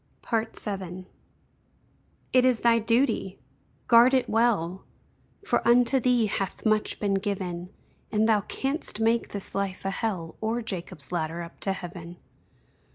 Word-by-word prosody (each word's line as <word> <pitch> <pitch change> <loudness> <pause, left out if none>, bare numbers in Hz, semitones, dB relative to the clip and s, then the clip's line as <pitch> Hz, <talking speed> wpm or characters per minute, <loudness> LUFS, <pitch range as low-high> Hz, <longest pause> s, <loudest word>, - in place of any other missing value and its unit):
VII. 195 -5 -3 1.3
It 255 -1 +6
is 255 -3 +3
thy 230 -1 +4
|DUTY|! 225 -4 +1 0.5
Guard 240 +3 +7
it 260 - +2
well! 210 -6 +1 0.6
For - - +2
unto 245 +2 +5
thee 245 -2 +3
hath 200 -1 -3
much 215 -1 +1
been 200 -2 0
given, 185 -3 -3 0.4
And 215 0 +2
thou 215 -2 +4
canst 270 +3 -2
make 225 +1 +2
this 200 -1 -5
life 195 -1 -3
a 195 - 0
Hell, 190 -6 -3
Or 225 +2 -1
Jacob's 180 -7 -6
ladder 170 0 -2
up 170 - -12
to 195 - -1
Heaven. 175 -2 -8
210 Hz, 135 wpm, -27 LUFS, 185-230 Hz, 1.3 s, Guard